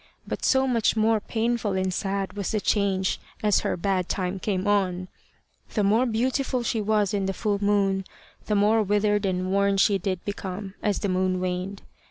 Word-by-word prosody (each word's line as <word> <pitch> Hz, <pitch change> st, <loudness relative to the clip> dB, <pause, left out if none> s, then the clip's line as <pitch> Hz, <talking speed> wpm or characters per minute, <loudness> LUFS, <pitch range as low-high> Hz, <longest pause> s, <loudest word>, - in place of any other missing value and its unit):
But -, -, -4 dB
so 265 Hz, 0 st, +3 dB
much 235 Hz, -5 st, +2 dB
more 220 Hz, 0 st, +3 dB
painful 225 Hz, -1 st, -1 dB
and 190 Hz, 0 st, 0 dB
sad 195 Hz, +1 st, -2 dB
was 200 Hz, -2 st, -3 dB
the 215 Hz, -, 0 dB
change 195 Hz, -2 st, +1 dB, 0.2 s
as 210 Hz, -2 st, +4 dB
her -, -, -2 dB
bad 185 Hz, 0 st, -1 dB
time 185 Hz, 0 st, -2 dB
came 190 Hz, -1 st, -1 dB
on. 185 Hz, -3 st, +1 dB, 0.7 s
The 210 Hz, -, +2 dB
more 220 Hz, +6 st, +3 dB
beautiful 250 Hz, +2 st, 0 dB
she 230 Hz, -1 st, 0 dB
was 210 Hz, -1 st, +1 dB
in 195 Hz, -2 st, 0 dB
the 195 Hz, -, -1 dB
full 205 Hz, 0 st, -1 dB
moon, 195 Hz, -2 st, +2 dB, 0.4 s
the 210 Hz, -, +1 dB
more 210 Hz, +2 st, +4 dB
withered 205 Hz, 0 st, +1 dB
and 185 Hz, 0 st, -1 dB
worn 200 Hz, 0 st, +3 dB
did -, -, 0 dB
she 200 Hz, 0 st, +4 dB
become 190 Hz, +1 st, -4 dB
as 205 Hz, -1 st, +1 dB
the 200 Hz, -, 0 dB
moon 185 Hz, 0 st, +1 dB
waned. 185 Hz, +2 st, -3 dB
200 Hz, 185 wpm, -25 LUFS, 190-215 Hz, 0.7 s, as